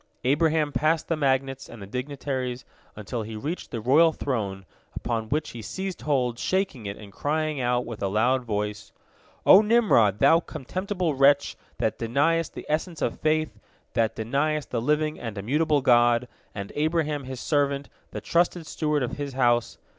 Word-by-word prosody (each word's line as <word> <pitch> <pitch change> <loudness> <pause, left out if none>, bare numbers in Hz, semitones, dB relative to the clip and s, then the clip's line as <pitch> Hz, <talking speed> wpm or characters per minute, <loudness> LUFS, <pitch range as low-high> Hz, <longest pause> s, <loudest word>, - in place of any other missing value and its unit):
Abraham 150 +3 +2
passed 155 +2 +1
the 165 - +2
magnates 135 -2 0
and 120 - -10
the 100 - -8
dignitaries 130 +1 -4 0.3
until 105 +3 -5
he 110 +1 -6
reached 150 +11 -5
the 115 - -4
royal 145 +9 +5
throne, 100 -10 -3 0.3
upon 115 -2 -3
which 150 +1 -1
he 115 - -8
seized 190 - -5
hold, 125 -5 0
shaking 185 - -1
it 100 - -5
and 100 -2 -12
crying 155 +1 -1
out 125 0 +1
with 115 -2 -7
a 100 - +1
loud 120 +6 +2
voice: 105 -2 -3 0.5
"O 195 - +9
Nimrod, 210 - +4
thou 140 +8 +5
contemptible 180 +3 -3
wretch, 140 +1 +4 0.2
that - - -1
deniest 145 +8 +1
the - - -7
essence 160 +2 -2
of - - -2
faith, 155 0 0 0.3
that 115 -1 +1
deniest 140 +6 -1
the 120 - -1
living 150 +4 0
and 115 -3 -6
immutable 145 +8 +1
God, 120 -1 +4 0.3
and 100 -1 -6
Abraham 150 -2 0
His 130 -1 -6
servant, 140 -2 0 0.2
the - - -6
trusted 170 0 +1
steward 150 -3 -1
of 125 - -4
His 145 -2 -4
house. 120 -2 +1
140 Hz, 165 wpm, -26 LUFS, 120-155 Hz, 0.5 s, O